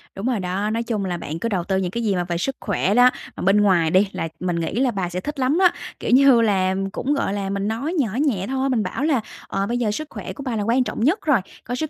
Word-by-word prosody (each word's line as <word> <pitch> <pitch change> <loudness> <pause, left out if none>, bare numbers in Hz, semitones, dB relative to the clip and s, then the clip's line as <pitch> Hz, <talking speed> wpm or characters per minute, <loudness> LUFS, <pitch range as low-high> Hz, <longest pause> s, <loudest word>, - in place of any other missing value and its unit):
Đúng 195 - -5
rồi 250 -4 0
đó, 190 +3 -2
nói 225 +2 -1
chung 215 -4 -2
là 175 -2 -2
bạn 160 0 -6
cứ 230 - -2
đầu 185 -4 -1
tư 190 +2 0
những 185 -2 -1
cái 235 +3 -3
gì 205 -4 +1
mà 180 - 0
về 175 -1 -3
sức 265 +10 -2
khỏe 200 -1 0
đó, 245 +1 +7 0.3
bên 195 +3 +4
ngoài 175 -5 +3
đi, 190 +2 +4
là 165 - -3
mình 180 -1 -1
nghĩ 170 -1 -2
là 260 -1 +2
bà 190 -5 -2
sẽ 180 +1 -3
thích 295 +4 -5
lắm 265 +4 +2
á. 365 -2 +6 0.3
Kiểu - - -2
như 260 -2 +6
là, 190 -4 +2 0.2
cũng 275 +7 -1
gọi 275 -8 -1
là, 200 -1 -3
mình 200 +1 -2
nói 240 +10 -2
nhỏ 265 -8 +1 0.2
nhẹ 200 -9 0
thôi, 265 +1 -1
mình 240 -5 +1
bảo 185 +8 -3
là 295 -6 +2 0.3
"Ờ, 195 0 -1
bây 240 - -1
giờ 230 -4 0
sức 310 +8 -4
khỏe - - -7
của 280 - -8
bà 250 -4 -2
là 210 - -1
quan 235 +4 +2
trọng - - -5
nhất 315 - +3
rồi, 290 -7 +4 0.2
có 245 - -4
sức 310 +4 -3
215 Hz, 295 wpm, -22 LUFS, 190-255 Hz, 0.3 s, đó